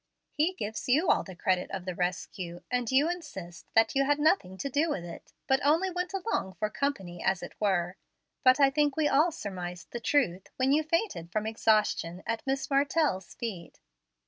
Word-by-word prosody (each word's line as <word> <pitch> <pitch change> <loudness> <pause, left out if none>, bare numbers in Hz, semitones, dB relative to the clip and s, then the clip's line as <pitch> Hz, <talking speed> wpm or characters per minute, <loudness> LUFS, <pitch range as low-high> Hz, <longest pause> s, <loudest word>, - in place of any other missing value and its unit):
He 315 +5 +1
gives 220 - -4
you 310 +7 +4
all - - +3
the 190 - -10
credit 180 +1 0
of 190 -2 -5
the 185 - -3
rescue, 175 0 -3
and 245 -1 0
you 275 +4 +4
insist 190 - -6
that 225 0 +5
you 275 - +3
had 290 +1 +2
nothing 295 - +2
to 280 - -3
do 290 +5 +1
with 185 - -2
it, 170 - -10
but 265 +1 +2
only 325 +6 +3
went 360 0 -3
along 385 - -2
for 215 +2 -2
company, 195 -12 -3
as 190 -2 +1
it - - -7
were. 180 -3 +1 0.5
But 255 +1 +6
I 275 -1 +6
think 290 0 +1
we 310 -2 +3
all 300 +5 +4
surmised 180 - -6
the 240 - -4
truth, 225 -9 +1
when 260 +1 +2
you 300 +2 +4
fainted 315 - -1
from 215 +3 -1
exhaustion 215 -5 +1
at 230 -1 -2
Miss 270 0 0
Martell's 280 - +1
feet. 195 -9 -6
235 Hz, 195 wpm, -29 LUFS, 185-290 Hz, 0.5 s, But